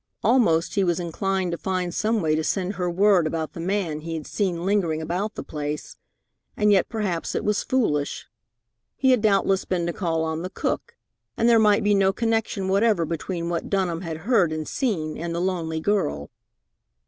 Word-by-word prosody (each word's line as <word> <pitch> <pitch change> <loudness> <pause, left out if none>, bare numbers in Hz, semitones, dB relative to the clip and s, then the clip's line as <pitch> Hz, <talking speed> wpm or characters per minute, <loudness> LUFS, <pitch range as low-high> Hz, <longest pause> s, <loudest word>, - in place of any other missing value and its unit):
Almost 210 -9 +3
he 200 - +2
was 175 -2 +1
inclined 185 +2 -1
to 170 - -4
find 185 -2 -2
some 220 +2 +1
way 155 -1 +2
to 155 +1 0
send 190 +3 -1
her 180 -3 -2
word 185 -1 +4
about 160 0 -3
the - - -8
man 175 -3 -1
he 165 +1 -5
had 155 - -5
seen 180 -4 -2
lingering 185 -6 +1
about 180 +7 -3
the - - -5
place, 150 0 -5 0.6
and 210 0 +3
yet 195 -3 +3
perhaps 200 -7 -2
it - - -2
was 210 0 +1
foolish. 150 - 0 0.7
He 265 -1 +3
had 250 -4 +3
doubtless 195 -2 +2
been 175 -2 -1
to 170 - -2
call 165 -4 -1
on 160 0 -2
the 180 - -4
cook, - - -3 0.4
and 230 - +2
there 230 -1 +6
might 210 -2 +4
be 205 0 +3
no 195 -1 +4
connection 225 -3 -1
whatever 200 -2 +2
between 170 +2 -3
what 170 -1 -3
Dunham 180 -4 0
had 165 -3 -5
heard 205 -9 +3
and 155 -1 -4
seen 160 - -2
and 170 0 -3
the - - -1
lonely 170 -3 -1
girl. 190 -7 -1
185 Hz, 195 wpm, -24 LUFS, 165-205 Hz, 0.7 s, there